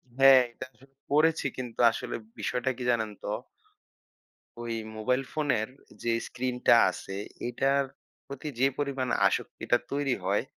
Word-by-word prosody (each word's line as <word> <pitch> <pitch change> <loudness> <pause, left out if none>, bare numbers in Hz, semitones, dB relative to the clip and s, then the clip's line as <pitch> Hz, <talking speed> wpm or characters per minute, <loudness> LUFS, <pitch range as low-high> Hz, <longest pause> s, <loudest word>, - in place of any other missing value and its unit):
হ্যাঁ। 135 0 +8
এটা 120 - -8
আসলে 125 +4 -20 0.2
পড়েছি। 155 +2 +3
কিন্তু 125 -3 -6
আসলে - - -4 0.2
বিষয়টা 125 +1 -1
কি 125 - -5
জানেন 110 -2 0
তো - - -5 1.3
ওই 120 -1 -3 0.2
মোবাইল 125 +4 +1
ফোনের 140 -8 0 0.4
যে 120 - +1 0.2
স্ক্রিনটা 125 -1 +2 0.2
আছে, 95 +1 -7 0.3
এটার 135 +3 +2 0.4
প্রতি 140 +2 -7
যে 135 - +5
পরিমাণে 140 -3 -1
আসক্তিটা 120 - 0
তৈরি 140 -2 +1
হয়, 100 +2 +2
130 Hz, 130 wpm, -28 LUFS, 120-140 Hz, 1.3 s, হ্যাঁ